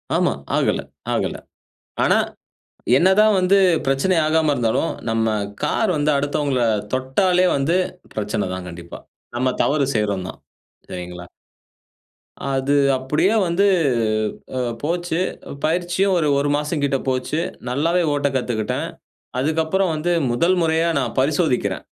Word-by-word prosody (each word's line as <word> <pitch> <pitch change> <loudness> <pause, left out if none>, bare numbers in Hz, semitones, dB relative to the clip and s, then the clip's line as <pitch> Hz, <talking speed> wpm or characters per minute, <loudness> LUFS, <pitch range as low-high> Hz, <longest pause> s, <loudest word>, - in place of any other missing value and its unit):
ஆமா. - - +2 0.2
ஆகல - - +1 0.3
ஆகல. - - -1 0.7
ஆனா - - +4 0.8
என்னதான் 200 +6 +4
வந்து 185 +2 +4 0.3
பிரச்சனை 135 +8 +1
ஆகாம 155 -1 +2
இருந்தாலும், 120 -4 0 0.2
நம்ம 115 0 +1 0.4
கார் 220 -4 +1
வந்து 150 0 +1
அடுத்தவங்கள 140 -2 0 0.3
தொட்டாலே 180 +8 +2
வந்து, 140 +5 +1 0.4
பிரச்சனை 105 -1 -2
தான் 95 -1 -5
கண்டிப்பா, 85 0 -9 0.4
நம்ம 130 0 +1
தவறு 145 -1 +2
செய்றோம் 100 -4 0
தான், - - -10 0.5
சரிங்களா. 90 0 -7 1.3
அது 135 +2 +1 0.2
அப்படியே 150 +10 +1
வந்து 175 +4 +2 0.9
அ - - 0 0.2
போச்சு, 170 +1 -1 0.5
பயிற்சியும் 175 +4 +1
ஒரு 155 - +1
1 145 +1 0
மாசம் 150 0 -2
கிட்டே 135 -1 +1
போச்சு, 130 +4 -1 0.3
நல்லாவே 165 +8 +1
ஓட்ட 145 -1 +1
கத்துக்கிட்டேன், 120 -4 -2 0.5
அதுக்கப்புறம் 160 +6 +1
வந்து 165 +3 -1 0.2
முதல் 170 +10 +2
முறையா 165 +1 +2
நான் - - -3
பரிசோதிக்கிறேன், 145 0 0
145 Hz, 115 wpm, -21 LUFS, 130-170 Hz, 1.3 s, ஆனா